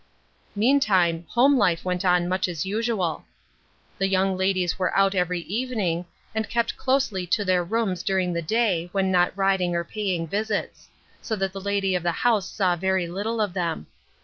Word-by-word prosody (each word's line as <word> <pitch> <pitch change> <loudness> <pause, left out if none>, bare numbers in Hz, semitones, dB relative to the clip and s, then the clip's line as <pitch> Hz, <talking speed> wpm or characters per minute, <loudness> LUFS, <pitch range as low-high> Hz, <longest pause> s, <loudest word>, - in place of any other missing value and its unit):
Meantime, 195 - +2
home 270 +4 +4
life 180 -5 +1
went 180 0 -1
on 180 -1 +3
much 185 +1 0
as 175 -1 -3
usual. 210 -4 -1 0.8
The 195 - +2
young 190 0 +1
ladies 185 -1 0
were 185 - 0
out 195 0 +4
every 180 -1 0
evening, 200 -4 -2 0.3
and 220 -1 -2
kept 235 -1 0
closely 255 -9 0
to 205 +3 +1
their 185 -1 +2
rooms 195 -2 -1
during 185 -1 0
the 170 - -1
day, 180 -2 0
when 190 -1 +1
not 180 -1 +3
riding 190 -3 +1
or 170 - 0
paying 185 -3 -2
visits; 210 +5 -3 0.3
so 220 - -2
that 195 -2 -2
the 195 - -6
lady 200 -1 0
of 180 - 0
the 175 +1 0
house 220 -2 +1
saw 185 -3 +1
very 190 0 0
little 205 +6 -3
of 205 -4 0
them. 170 - -2
190 Hz, 175 wpm, -24 LUFS, 180-210 Hz, 0.8 s, home